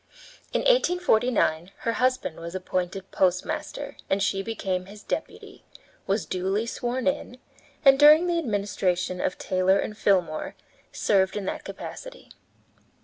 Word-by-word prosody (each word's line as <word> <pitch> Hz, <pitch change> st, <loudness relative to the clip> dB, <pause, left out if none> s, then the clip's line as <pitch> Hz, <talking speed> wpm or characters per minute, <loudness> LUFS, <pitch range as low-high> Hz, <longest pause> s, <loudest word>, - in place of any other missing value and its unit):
In -, -, 0 dB
1849 250 Hz, -, +2 dB
her 230 Hz, -, 0 dB
husband 255 Hz, -9 st, 0 dB
was 170 Hz, +2 st, -7 dB
appointed 185 Hz, +1 st, -3 dB
postmaster, 185 Hz, -1 st, -1 dB
and 195 Hz, +1 st, +1 dB
she 195 Hz, -1 st, 0 dB
became 190 Hz, -4 st, -3 dB
his 205 Hz, +1 st, -12 dB
deputy, -, -, -6 dB, 0.4 s
was 200 Hz, +1 st, 0 dB
duly 190 Hz, +4 st, -1 dB
sworn 245 Hz, +2 st, -3 dB
in, 280 Hz, -3 st, -1 dB, 0.5 s
and, 270 Hz, 0 st, +7 dB
during 305 Hz, +3 st, +8 dB
the 345 Hz, -1 st, +1 dB
administration 195 Hz, -, -1 dB
of -, -, -1 dB
Taylor 185 Hz, +1 st, +2 dB
and 210 Hz, -, -3 dB
Fillmore, 180 Hz, -7 st, 0 dB, 0.4 s
served 190 Hz, -1 st, +1 dB
in 200 Hz, -, -4 dB
that -, -, -4 dB
capacity. -, -, -9 dB
200 Hz, 130 wpm, -26 LUFS, 185-255 Hz, 0.5 s, during